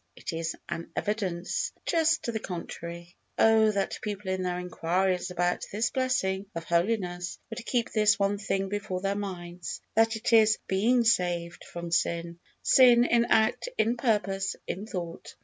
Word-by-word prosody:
It 190 - -6
is 165 0 -3
an 165 - -5
evidence 205 - -2
just 325 -1 +2
to 235 - -2
the 220 - -2
contrary. 170 -1 -7 0.2
Oh, 220 -1 +5
that 200 -2 -1
people, 205 -2 -4
in 185 0 -1
their 180 -1 -1
enquiries 180 +1 0
about 175 0 0
this 215 +2 0
blessing 205 -7 0
of 165 - -4
holiness, 175 0 -1
would 245 - -5
keep 240 -1 -1
this 210 -2 +4
one 200 0 +1
thing 195 -1 -1
before 200 -2 -3
their 195 +1 0
minds, 180 -3 -5
that 225 +1 +3
it 220 +1 -2
is 220 -1 +6
being 235 +6 +2
saved 175 -6 0
from 170 0 -7
sin! 170 0 0 0.2
sin 245 -2 +7
in 235 -1 +3
act, 220 - +2
in 235 - +2
purpose, 195 -5 0
in 200 +4 -5
thought! 175 -5 -6
195 Hz, 160 wpm, -28 LUFS, 175-220 Hz, 0.2 s, sin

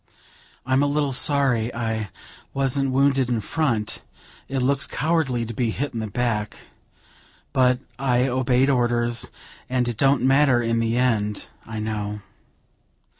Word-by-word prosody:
I'm 130 +1 +2
a 145 - +3
little 145 -1 0
sorry 125 -4 +2
I 110 -3 -2 0.5
wasn't 135 0 0
wounded 135 -1 +2
in 120 -2 +1
front; 115 -2 -1 0.5
it 135 - -2
looks 140 +1 +2
cowardly 145 -7 0
to 115 - -6
be 120 0 0
hit 140 +6 -3
in 115 - -3
the 110 - -3
back, 105 -1 -2 0.9
but 125 -1 +4 0.2
I 125 -1 +2
obeyed 130 0 +2
orders, 120 -2 0 0.4
and 125 -1 0
it 120 -3 -3
don't 135 0 +3
matter 135 -1 +4
in 115 -1 0
the 115 +1 0
end, 105 -5 0 0.2
I 110 0 -6
know." 105 -1 -3
125 Hz, 140 wpm, -23 LUFS, 115-135 Hz, 0.9 s, but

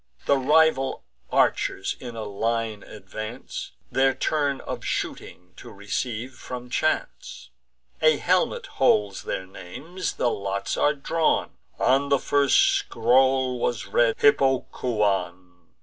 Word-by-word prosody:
The 140 - +4
rival 150 -1 +3 0.3
archers 95 - +1
in 120 -3 -8
a 110 - -4
line 110 +1 -2
advance, 110 - -8 0.2
Their 135 0 +3
turn 145 -3 0
of - - -6
shooting 90 0 -5
to - - -11
receive 115 +5 -4
from 125 0 -8
chance. 140 - -2 0.5
A 155 -1 +5
helmet 180 +3 +1
holds 105 -6 +1
their 95 - -4
names; 150 - -6
the 120 - 0
lots 100 0 -3
are 150 +1 +2
drawn: 160 +3 0 0.3
On 135 +2 +2
the 140 - +4
first 140 0 +2 0.2
scroll 130 +2 +2
was 120 0 -1
read - - +2
Hippocoon. 100 - 0
125 Hz, 120 wpm, -25 LUFS, 105-140 Hz, 0.5 s, A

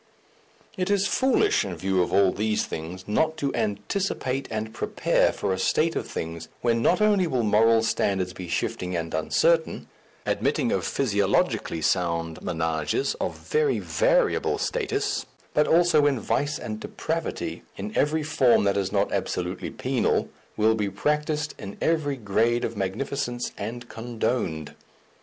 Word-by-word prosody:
It 185 +1 -1
is 200 -1 +2
foolish, 260 +4 +3
in 95 -4 -4
view 95 +2 +1
of 90 - -1
all 100 -2 +4
these 105 +2 0
things, 90 +4 -7
not 160 +9 +1
to 140 -1 -1
anticipate 125 - -2
and 110 0 -4
prepare - - +1
for - - -2
a 95 - -3
state 160 - +2
of - - -2
things 80 0 -5
when 115 -1 +2
not 180 - +3
only 205 -4 +4
will 125 -6 0
moral 110 +2 +4
standards 95 -4 0
be 90 -2 -7
shifting 90 +1 -2
and 85 -1 -3
uncertain, 160 - +1 0.4
admitting - - 0
of - - 0
physiologically 100 - +1
sound 85 -3 0
ménages 80 - -1
of - - -2
very 455 -2 +1
variable - - +2
status, 415 -3 -1 0.3
but 150 - +3
also 170 -2 +5
when 145 -3 +2
vice 145 +7 0
and 110 -1 -5
depravity, - - -3 0.2
in 105 +2 -6
every 155 +2 +2
form 135 -7 +3
that 100 0 +2
is 95 -1 -1
not 100 0 +1
absolutely - - -2
penal, - - 0 0.3
will 110 +1 +4
be 105 -2 -1
practised 150 +7 -1
in 100 - -8
every 155 -4 +1
grade 115 +2 +1
of 115 - -4
magnificence 120 +5 -2
and 120 +4 -6
condoned. 115 - -2
115 Hz, 145 wpm, -25 LUFS, 95-150 Hz, 0.4 s, also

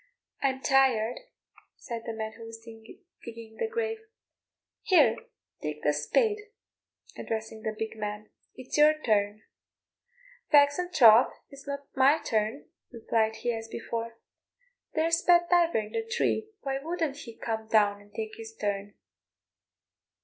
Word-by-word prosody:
"I'm 265 -1 0
tired," 255 -4 +3 0.6
said 230 -3 -7
the 230 - -3
man 220 0 -4
who 230 - -10
was 225 0 -9
digging 225 - -13
the - - -1
grave; 450 -1 -2 0.8
"here, 300 - +5 0.5
take 150 0 -5
the 150 - +3
spade," 420 - +1 0.8
addressing 220 0 -5
the 220 -1 -3
big 220 0 -4
man, 210 0 -5 0.2
"it's 255 +3 -4
your 305 +1 +6
turn." 210 -4 0 1.1
"Faix 285 +1 +5
an' 360 0 -3
troth, 230 -3 +7 0.2
it's 275 0 -13
no 280 0 -2 0.2
my 270 +3 +5
turn," 215 -6 -2 0.3
replied 220 -2 0
he, 240 - +2
as 225 0 -5
before. 230 0 -5 0.8
"There's 330 +2 +2
Pat 345 0 +4
Diver 345 -4 +4
in 215 -1 -3
the 450 - -2
tree, 450 -1 -1
why 270 -1 -2
wouldn't 320 -2 -2
he 230 -6 -10
come 220 -1 -4
down 205 -2 +3
and 205 0 -20
tak' 220 0 -6
his 225 0 -9
turn?" 205 -1 -3
230 Hz, 140 wpm, -28 LUFS, 220-295 Hz, 1.1 s, troth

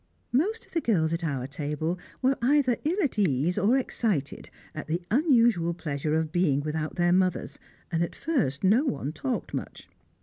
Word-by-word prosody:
Most 395 - 0
of - - -27
the 330 - 0
girls 165 - +1
at 165 +1 -2
our 140 -6 -2
table 150 +5 -3 0.2
were 265 +1 +4
either 255 -1 +3
ill 330 +6 0
at 255 -7 -1
ease 165 -2 +2
or 220 +6 +3
excited 210 - -2 0.2
at 155 - -6
the 170 +3 -2
unusual 230 - +3
pleasure 150 -2 -2
of 160 -1 0
being 160 -6 +2
without 155 +1 -3
their 175 -1 +3
mothers, 185 -1 0 0.3
and 165 -1 0
at 170 - -2
first 215 - -1
no 215 +8 +4
one 145 - -2
talked 130 -4 -3
much. - - -6
175 Hz, 175 wpm, -27 LUFS, 155-240 Hz, 0.3 s, were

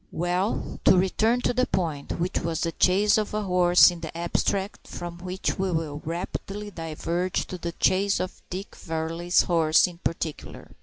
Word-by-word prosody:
Well, 180 +4 -1
to 185 - +7
return 220 +6 +2
to 245 - +1
the 255 +1 +1
point, 155 -6 -2
which 180 +3 -1
was 165 -1 -2
the 165 - 0
chase 200 +6 +3
of 210 0 -3
a 215 - -1
horse 180 -1 +6
in 175 - -8
the 165 0 -6
abstract; 190 +3 -1
from 175 0 -7
which 185 +2 -3
we 190 -1 0
will 155 -3 -2
rapidly 195 +5 -5
diverge 170 +2 -2
to 185 - -7
the 170 0 -4
chase 195 +3 +2
of 185 - -5
Dick 190 +3 -6
Varley's 165 +2 0
horse 160 -3 +4
in 175 -2 -7
particular. 165 -3 -5
175 Hz, 170 wpm, -26 LUFS, 165-190 Hz, -, to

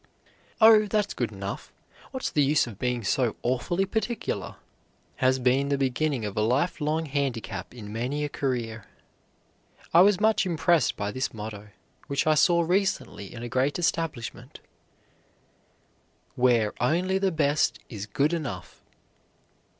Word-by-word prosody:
"Oh, 220 -1 +7
that's 210 0 0
good - - -2
enough, - - -6 0.4
what's 260 -1 -4
the 150 - +2
use 145 +2 +3
of 110 -5 -10
being 125 -2 -1
so 120 +3 +1
awfully 130 +10 0
particular?" 220 +3 -3 0.6
has 130 -1 +3
been 130 +2 +2
the 140 - +1
beginning 135 -1 0
of 105 - -5
a - - +1
life 130 +10 +1
long 155 +2 0
handicap 130 - -3
in 105 -4 -9
many 130 +6 -2
a - - -1
career. 120 -6 -3 1.1
I 170 - +8
was 195 0 +5
much 220 0 +3
impressed 170 - +2
by 100 0 -2
this 130 0 -3
motto, 105 -1 -7 0.4
which 140 - 0
I 155 - +4
saw 170 +3 +4
recently 180 - -1
in 120 - -8
a - - -4
great 130 +4 0
establishment, 165 -8 -3 1.7
"WHERE 120 -3 +2
ONLY 180 +9 +1
THE 195 -1 +1
BEST 150 -2 +1
IS 105 -3 -7
GOOD 145 +9 +1
ENOUGH." 130 - -5
140 Hz, 140 wpm, -26 LUFS, 120-170 Hz, 1.7 s, I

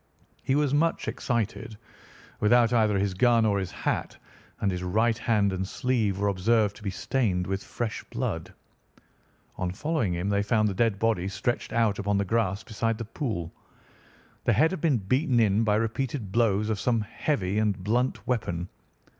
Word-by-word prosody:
He 135 - 0
was 145 -2 +2
much 165 +3 +1
excited, 115 -2 -2 0.6
without 120 +2 +4
either 110 -3 +3
his 100 0 0
gun 115 +3 +4
or 100 -2 +2
his 95 -2 -3
hat, - - -3 0.4
and 100 - +1
his 90 -1 -3
right 110 +6 +1
hand 105 -4 +1
and 95 0 -2
sleeve 110 -5 0
were 100 +1 0
observed 105 +2 +2
to - - -15
be 105 - -3
stained 100 -3 0
with 95 +1 -3
fresh 115 -3 -4
blood. - - -4 1.1
On 90 - -1
following 125 - -1
him 90 +3 -2
they 100 0 +2
found 110 +1 +2
the 100 - -1
dead 110 0 +1
body 100 -4 +1
stretched 100 +5 -2
out 110 -3 +1
upon 100 0 0
the 100 - +1
grass 100 -1 0
beside 115 +1 -2
the 115 - -5
pool. 105 - -4 0.9
The - - +4
head 160 +2 +4
had 190 - -4
been 150 -6 +3
beaten 125 - +1
in 110 0 +3
by 105 -2 +2
repeated 115 0 -2
blows 110 -2 +2
of 105 - -2
some 115 0 +1
heavy 105 -3 -1
and 105 -3 +1
blunt 120 +6 0
weapon. 90 -8 -2
110 Hz, 175 wpm, -27 LUFS, 100-120 Hz, 1.1 s, without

